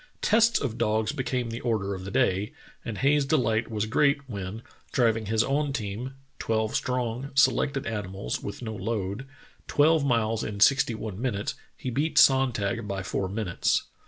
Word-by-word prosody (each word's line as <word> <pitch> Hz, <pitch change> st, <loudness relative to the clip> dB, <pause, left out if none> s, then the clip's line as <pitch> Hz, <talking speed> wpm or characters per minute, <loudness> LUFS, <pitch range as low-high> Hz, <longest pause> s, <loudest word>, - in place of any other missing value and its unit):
Tests 225 Hz, +2 st, +4 dB
of 120 Hz, -5 st, -3 dB
dogs 110 Hz, 0 st, +1 dB
became 130 Hz, -4 st, -2 dB
the 115 Hz, -, -5 dB
order 105 Hz, -5 st, -1 dB
of 95 Hz, -1 st, -7 dB
the -, -, -5 dB
day, 100 Hz, -3 st, +1 dB, 0.3 s
and 110 Hz, -3 st, -5 dB
Hayes's 140 Hz, +4 st, +3 dB
delight 115 Hz, -6 st, +1 dB
was 110 Hz, -2 st, -1 dB
great 140 Hz, +4 st, +2 dB
when, 100 Hz, 0 st, -6 dB, 0.3 s
driving 115 Hz, -3 st, +2 dB
his 110 Hz, +1 st, +2 dB
own 145 Hz, 0 st, 0 dB
team 120 Hz, +2 st, -4 dB
— 135 Hz, -, -40 dB
twelve 110 Hz, -1 st, 0 dB
strong, 125 Hz, +1 st, -2 dB
selected 140 Hz, 0 st, +3 dB
animals 100 Hz, -3 st, -4 dB
with 100 Hz, -, -6 dB
no 110 Hz, -1 st, -4 dB
load 105 Hz, +3 st, -3 dB, 0.2 s
— -, -, -31 dB
twelve 155 Hz, +1 st, +4 dB
miles 115 Hz, -4 st, +1 dB
in 100 Hz, -1 st, -5 dB
sixty 130 Hz, 0 st, +4 dB
one 110 Hz, -2 st, -6 dB
minutes, 105 Hz, -6 st, -1 dB, 0.2 s
he 130 Hz, -, -4 dB
beat 150 Hz, +6 st, -1 dB
Sonntag 120 Hz, -5 st, +3 dB
by 100 Hz, -1 st, -3 dB
four 95 Hz, 0 st, -2 dB
minutes. 100 Hz, -3 st, 0 dB
115 Hz, 170 wpm, -27 LUFS, 105-135 Hz, 0.3 s, Tests